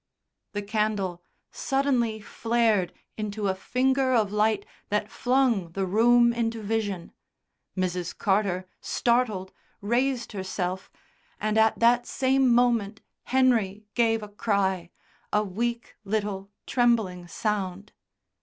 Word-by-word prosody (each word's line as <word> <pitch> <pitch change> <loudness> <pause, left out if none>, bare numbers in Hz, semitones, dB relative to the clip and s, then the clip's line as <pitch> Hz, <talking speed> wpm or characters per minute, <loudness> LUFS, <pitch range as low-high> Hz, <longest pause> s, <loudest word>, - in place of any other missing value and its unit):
The 205 0 -3
candle 205 -4 -1 0.3
suddenly 260 -5 0
flared 225 -3 +1 0.3
into 210 -1 -3
a 190 - +2
finger 260 +6 +1
of 215 -4 +2
light 210 -1 +1 0.2
that 210 +1 -1
flung 245 -9 +1
the 195 +1 -1
room 235 +4 +4
into 230 -1 -1
vision. 205 -4 -2 0.7
Mrs. 180 -2 -2
Carter, 190 -3 +1
startled, 235 -6 0 0.3
raised 240 +3 0
herself, 190 -2 -3 0.5
and 215 0 -1
at 220 0 +4
that 240 +1 +3
same 265 -1 +2
moment 235 -4 +2 0.2
Henry 230 -6 +2
gave 225 -2 +2
a - - -6
cry, 195 -4 0 0.4
a 210 - +2
weak 235 +4 -3
little 200 -1 -2 0.2
trembling 220 -8 +1
sound. 200 0 -3
215 Hz, 110 wpm, -26 LUFS, 195-235 Hz, 0.7 s, room